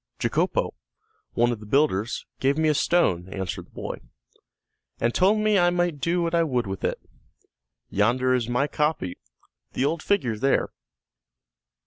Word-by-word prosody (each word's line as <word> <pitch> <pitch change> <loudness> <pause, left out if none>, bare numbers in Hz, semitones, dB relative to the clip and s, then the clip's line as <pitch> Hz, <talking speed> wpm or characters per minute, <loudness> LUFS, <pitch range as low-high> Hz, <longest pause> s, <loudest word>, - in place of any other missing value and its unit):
"Jacopó, - - 0 0.6
one 120 +1 +2
of 115 - -4
the 105 - -11
builders, 120 -4 +1
gave 140 +2 +2
me 160 -1 +3
a - - +4
stone," 95 - +1
answered 95 -2 -5
the - - -29
boy, - - -5 1.0
"and 115 +1 +1
told 195 +4 +4
me 215 -1 +3
I 175 0 +4
might 175 -4 -1
do 170 +1 +1
what 165 0 -2
I 170 - +4
would 125 -7 0
with 95 0 -5
it. - - -1 0.9
Yonder 125 +5 +2
is 120 -2 0
my 125 +3 +2
copy, 150 - -1 0.5
the 130 - 0
old 160 +3 -1
figure 130 - 0
there." 135 +3 +2
140 Hz, 155 wpm, -25 LUFS, 115-170 Hz, 1.0 s, a